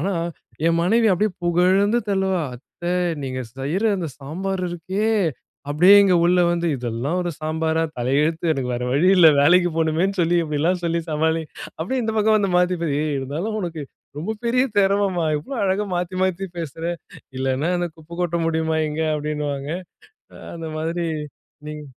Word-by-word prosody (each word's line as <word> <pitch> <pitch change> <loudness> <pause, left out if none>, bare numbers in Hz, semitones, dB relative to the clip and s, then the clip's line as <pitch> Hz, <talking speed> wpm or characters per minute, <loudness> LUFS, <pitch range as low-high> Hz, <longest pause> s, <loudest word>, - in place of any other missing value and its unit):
ஆனா 195 +5 -1 0.5
என் 165 0 +3
மனைவி 225 +6 +3
அப்படியே 210 +4 +1
புகழ்ந்து 185 +6 +3
தள்ளுவா. 190 -3 +1
"அத்தை 175 +7 -6 0.3
நீங்க 130 -1 -4 0.2
செய்ற 145 +9 -2
அந்த 175 -4 -3
சாம்பார் 185 +7 -4
இருக்கே." 185 +5 -2 0.6
அப்படியே 175 +7 +6
இங்க 195 -2 +4
உள்ள 180 +1 +4
வந்து 170 0 0
இதெல்லாம் 125 +8 -2
ஒரு 175 - -2
சாம்பாரா? 160 +1 0 0.2
தலையெழுத்து. 150 +7 +1
எனக்கு 130 -4 -2
வேற 120 - -3
வழி 145 +7 +3
இல்லை. 170 -3 +8
வேலைக்கு 175 +4 +5
போணுமேன்னு 165 +5 +1
சொல்லி, 170 +1 +2
இப்படிலாம் 160 +4 0
சொல்லி 170 0 0
சமாளி." 160 +1 +1 0.4
அப்படியே 225 +11 -1
இந்த 220 -1 -2
பக்கம் 215 0 +4
வந்து 200 -2 0
மாத்திப்பா. 180 -2 +1
ஏய்! 150 -1 -1
இருந்தாலும் 155 +11 -3
உனக்கு 170 -5 -4 0.4
ரொம்ப 200 +9 -3
பெரிய 250 +2 +3
திறமைம்மா. 195 -3 +2
இவ்வளோ 265 - -7
அழகா 195 +2 0
மாத்தி, 180 +1 -3
மாத்தி 190 +1 -1
பேசுற." 165 0 -6 0.5
"இல்லைன்னா 135 +5 0
அந்த 175 0 -1
குப்பை 165 +1 -11
கொட்ட 170 -1 0
முடியுமா 160 -1 0
இங்க." 155 +2 -2
அப்படீன்னுவாங்க. 150 -1 -3 0.8
அந்த 165 -1 -6
மாதிரி 165 +2 -2 0.6
நீங் 150 0 -7
170 Hz, 155 wpm, -22 LUFS, 155-185 Hz, 0.8 s, இல்லை